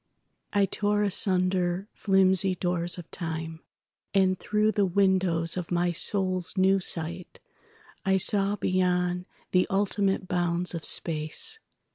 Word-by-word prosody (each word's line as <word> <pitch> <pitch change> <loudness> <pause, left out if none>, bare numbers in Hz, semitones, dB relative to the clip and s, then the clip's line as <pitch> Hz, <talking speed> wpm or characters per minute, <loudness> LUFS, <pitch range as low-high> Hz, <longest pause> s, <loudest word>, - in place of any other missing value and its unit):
I 200 -1 +2
tore 205 +2 -1
asunder 185 -2 0
flimsy 190 -1 +2
doors 175 -1 -1
of 175 -2 -11
time, 160 -1 -5 0.6
And 185 -1 +2
through 215 +1 0
the 205 - 0
windows 185 -3 +1
of 180 -2 -5
my 175 0 0
soul's 185 +1 +1
new 190 +1 +3
sightI 190 - -3
saw 200 +1 +3
beyond 180 -2 -1 0.3
the 180 0 +2
ultimate 195 -1 0
bounds 175 0 -1
of 165 -2 -6
space. 155 - +1
185 Hz, 115 wpm, -26 LUFS, 175-195 Hz, 0.6 s, new